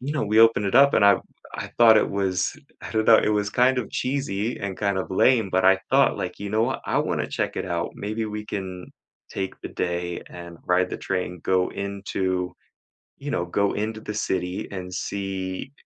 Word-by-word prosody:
you 135 +3 -3
know, 145 - 0
we 110 +2 +4
opened 115 -3 +5
it 100 - -2
up 140 +1 +6
and - - +4
I 100 0 +7 0.4
I - - -4
thought 115 -2 +8
it - - 0
was 95 +5 -1 0.2
I - - -7
don't 110 -1 +1
know, 115 - +8
it - - +1
was 105 0 -3
kind 125 +3 +3
of 120 - -4
cheesy 125 -5 -2
and 100 -1 -3
kind 100 -2 0
of 95 - -4
lame, 110 +1 +3
but 95 0 +1
I 95 0 +6
thought, - - +4
like, - - -5
"You 100 - -4
know 110 +1 +2
what? 130 +2 -2
I - - +1
wanna - - -1
check - - -2
it - - -3
out, 85 -1 -2
maybe 110 +2 -3
we 105 0 -6
can 95 -3 -6 0.5
take 95 - -4
the - - -5 0.2
day 85 0 -3
and 85 -1 -10
ride 90 +1 +2
the - - -3
train, 90 -1 -3
go 95 -1 +2
into, 95 -2 -3 0.6
you 145 +1 -5
know 85 - -1
go 100 +3 0
into 110 +1 -3
the 105 - -5
city 95 -3 -2
and 90 -2 -6
see, 95 +3 -4
100 Hz, 210 wpm, -24 LUFS, 95-110 Hz, 0.6 s, thought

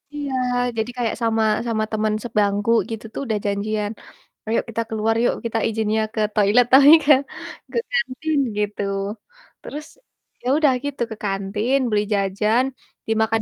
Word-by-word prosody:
Iya. 285 -2 -4 0.4
Jadi 220 +2 -1
kayak 235 -3 -1
sama 225 -1 +1 0.2
sama 220 -2 0
teman 215 0 0
sebangku 205 -1 +1 0.2
gitu 225 0 -6
tuh - - -4
udah 220 -3 -1
janjian, 205 +1 -1 0.6
"Ayo, 225 - +2
kita 230 +1 -2
keluar 220 0 0
yuk, - - +2
kita 230 -1 -1
izinnya 220 0 0
ke 215 - -1
toilet." 210 +4 +4
Tapi 280 +2 +9
kan 285 -2 +6 0.5
ke - - +1
kantin 315 - 0 0.2
gitu. 210 -1 -2 0.8
Terus, 300 +2 -7 0.6
ya 245 - -5
udah 300 -4 +4
gitu, 280 -3 -5
ke - - -4
kantin 205 +6 0
beli 210 -1 +1
jajan, 210 +5 +1 0.4
dimakan 220 0 +1
220 Hz, 150 wpm, -22 LUFS, 210-245 Hz, 0.8 s, Tapi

